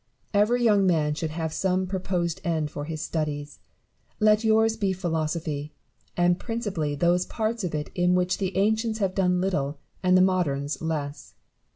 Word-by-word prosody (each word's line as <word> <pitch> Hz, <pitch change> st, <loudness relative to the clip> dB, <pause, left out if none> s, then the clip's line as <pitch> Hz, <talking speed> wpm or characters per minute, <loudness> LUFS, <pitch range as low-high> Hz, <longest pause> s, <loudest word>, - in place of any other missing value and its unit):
Every 220 Hz, +4 st, +3 dB
young 205 Hz, -4 st, +4 dB
man 155 Hz, -4 st, +2 dB
should 155 Hz, +1 st, -3 dB
have 160 Hz, 0 st, -3 dB
some 185 Hz, +1 st, 0 dB
proposed 180 Hz, -2 st, -2 dB
end 160 Hz, -4 st, -1 dB
for 145 Hz, -, -5 dB
his 155 Hz, 0 st, -4 dB
studies: 150 Hz, -2 st, -3 dB, 0.6 s
let 215 Hz, 0 st, +4 dB
yours 220 Hz, 0 st, +3 dB
be 200 Hz, -4 st, 0 dB
philosophy; 160 Hz, -4 st, -3 dB, 0.4 s
and 175 Hz, 0 st, +3 dB
principally 200 Hz, -11 st, -2 dB
those 175 Hz, +4 st, +2 dB
parts 225 Hz, 0 st, -2 dB
of 170 Hz, -4 st, -2 dB
it 150 Hz, -1 st, -4 dB
in 180 Hz, 0 st, +2 dB
which 180 Hz, +1 st, +1 dB
the 190 Hz, -1 st, -2 dB
ancients 220 Hz, +2 st, +1 dB
have 195 Hz, -3 st, 0 dB
done 180 Hz, -2 st, +2 dB
little 150 Hz, -7 st, -1 dB, 0.2 s
and 185 Hz, 0 st, +4 dB
the -, -, +5 dB
moderns 145 Hz, -7 st, 0 dB
less. 150 Hz, -3 st, -4 dB
180 Hz, 165 wpm, -26 LUFS, 155-195 Hz, 0.6 s, the